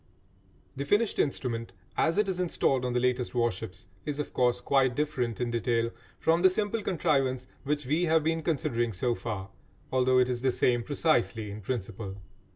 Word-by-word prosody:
The 140 - -3
finished 205 +9 +1
instrument 115 -7 -1 0.2
as 165 +3 +2
it 210 -1 +3
is 185 -2 -1
installed 135 -7 +1
on 125 - -1
the 125 - +2
latest 125 0 0
warships 115 -7 -2 0.2
is, 145 -1 -3
of 150 - -4
course, 125 -1 +2
quite 130 -1 +2
different 130 -6 -1
in 120 -1 -1
detail 115 0 +1 0.3
from 165 +1 +2
the 185 - +7
simple 210 +3 -1
contrivance 135 -9 +1 0.2
which 145 0 -1
we 155 +7 +1
have 160 -1 +3
been 160 +1 0
considering 120 -7 0
so 120 +6 0
far, 100 -5 -5 0.4
although 130 0 +3
it 125 -1 +5
is 125 -1 -2
the 130 - +2
same 120 -1 +2
precisely 120 -6 +1
in 105 +1 -7
principle. 100 -2 -4
130 Hz, 175 wpm, -29 LUFS, 120-155 Hz, 0.4 s, the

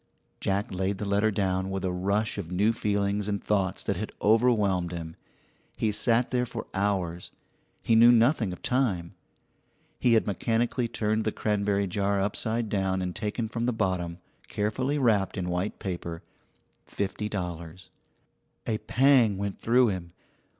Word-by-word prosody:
Jack 100 +1 -1
laid 95 +1 -1
the 105 - -4
letter 100 +2 +2
down 95 -2 -1
with 95 -1 -3
a 90 - 0
rush 100 +4 -1
of 85 -5 -5
new 105 +5 +2
feelings 100 -1 0
and 100 -1 -2
thoughts 100 -4 0
that - - -2
overwhelmed 105 -5 +3
him. 85 -2 -6 0.6
He 110 - +1
sat 115 +3 +1
there 125 0 +1
for - - -6
hours; 95 -4 -1 0.5
he - - +2
knew 115 +2 +8
nothing 120 -3 +3
of 90 - -9
time. 105 -10 0 0.9
He 120 - +3
had 110 - +4
mechanically 115 +3 0
turned 110 -1 -1
the 110 - 0
cranberry 100 -2 0
jar 100 +1 0
upside 110 +3 -1
down 95 -2 0
and 90 -1 -4
taken 110 +1 -2
from 115 +1 -3
the 125 - +2
bottom, 90 -5 -1 0.3
carefully 130 +7 -1
wrapped 110 -8 +2
in 90 -1 -2
white 90 +4 -2
paper, 85 -3 -5 0.6
fifty 105 +1 -3
dollars. 85 -3 -6 0.7
A 110 -2 -1
pang 125 -6 +4
went 100 0 -4
through 120 +1 +4
him. 90 -3 -5
100 Hz, 150 wpm, -27 LUFS, 95-110 Hz, 0.9 s, knew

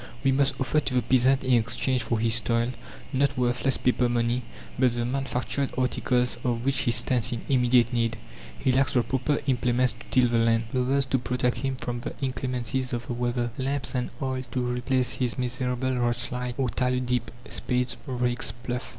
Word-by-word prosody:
We 135 - +4
must 135 0 +2
offer 140 +3 +2
to 140 -3 -2
the 125 - +2
peasant 130 +1 +3
in 130 -1 +2
exchange 120 +2 +1
for 115 0 -1
his 115 0 +2
toil 115 +2 0 0.4
not 140 +1 +1
worthless 125 +1 +1
paper 125 -1 +2
money, 120 +1 +1 0.4
but 125 -2 +4
the 120 0 -1
manufactured 135 +1 -1
articles 125 -1 +1
of 120 -1 -1
which 135 -1 +1
he - - +1
stands 120 0 +1
in 115 - -3
immediate 125 -2 +3
need. 115 -1 0 0.4
He 130 - +1
lacks 130 +1 +2
the 125 - +3
proper 135 +4 0
implements 125 -1 +2
to - - -18
till 125 -1 +4
the 115 -1 +2
land, 115 0 +3
clothes 130 +2 +1
to 130 -1 0
protect 125 0 0
him 135 -1 -2
from 120 -2 -4
the 120 - -6
inclemencies 130 -1 -2
of 120 -1 -3
the - - -4
weather, 120 0 -1
lamps 135 +2 -1
and 125 -2 -1
oil 130 -1 -1
to 125 -1 0
replace 125 +1 0
his 125 -1 -2
miserable 125 0 -1
rushlight 120 0 -1
or 130 -2 +1
tallow 125 +1 0
dip, 125 -1 -1 0.2
spades, 125 0 0
rakes, 125 -1 -1
ploughs. 125 +1 -4
125 Hz, 185 wpm, -26 LUFS, 120-130 Hz, 0.4 s, We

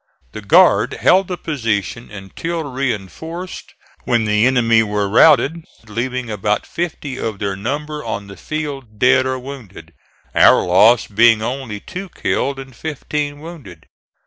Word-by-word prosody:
The - - -8
guard - - +4
held 190 +1 +3
the 180 - -4
position 115 - -3
until 105 - -5
reinforced, 135 - -5 0.3
when 120 -2 +1
the 105 +2 +3
enemy 115 -3 +3
were 105 -2 -1
routed 145 +8 +4 0.2
leaving 125 +3 -3
about 105 -1 -1
fifty 150 -6 -5
of 110 -3 -3
their 100 -1 -3
number 150 +8 -4
on 100 - -4
the 100 0 -11
field 140 -7 -6
dead 130 +3 +4
or 130 0 -1
wounded, 120 - -10 0.4
our - - +5
loss 105 +7 +5
being 115 +1 +4
only 125 -3 -4
two 185 - -8
killed 140 -4 -2
and 135 -2 -10
fifteen 145 0 -4
wounded. 140 - -11
125 Hz, 140 wpm, -18 LUFS, 105-150 Hz, 0.4 s, our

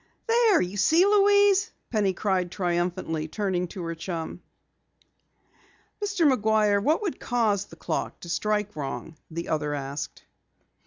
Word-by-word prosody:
"There! 460 -4 +4
You 180 +3 -2
see, 320 - +5
Louise!" 405 -1 +4 0.2
Penny 210 -4 +2
cried 185 -1 0
triumphantly, 175 -3 -1
turning 185 0 -1
to 180 +1 -7
her 165 0 -3
chum. 165 0 -5 1.6
"Mr. 400 -5 +1
McGuire, 215 -5 +3
what 315 - +2
would 385 - -3
cause 215 -5 0
the 165 - -14
clock - - -3
to - - -9
strike 210 +4 -1
wrong?" 145 +2 -5
the 170 +1 -5
other 150 -1 -1
asked. 140 +1 -6
200 Hz, 135 wpm, -26 LUFS, -, 1.6 s, see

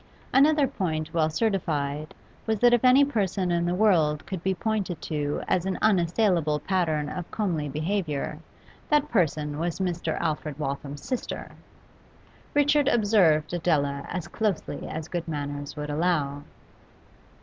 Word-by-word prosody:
Another 290 +2 +5
point 160 -8 -3
well 160 -2 +2
certified 155 -7 -1 0.3
was 220 0 +1
that 240 +3 +5
if 240 - +3
any 260 +2 +7
person 195 -8 -1
in 170 0 +1
the 175 - 0
world 165 -8 +3
could 185 -1 -5
be 190 +1 0
pointed 195 -4 -2
to 145 -2 -2
as 185 0 +1
an 190 - -1
unassailable 175 -5 +2
pattern 155 -2 0
of 175 +3 -6
comely 170 -9 -1
behaviour 155 -2 -2 0.5
that 300 0 +2
person 150 -7 0
was 170 0 -2
Mr. 175 -4 -2
Alfred 155 -2 -2
Waltham's 140 0 -4
sister. 255 - -4 1.0
Richard 290 0 +4
observed 200 - +3
Adela 145 -5 0
as 180 -1 -4
closely 210 -4 -2
as 160 0 -5
good 175 -1 -4
manners 145 -2 -4
would 150 0 -4
allow. 145 -3 0
170 Hz, 140 wpm, -26 LUFS, 150-205 Hz, 1.0 s, any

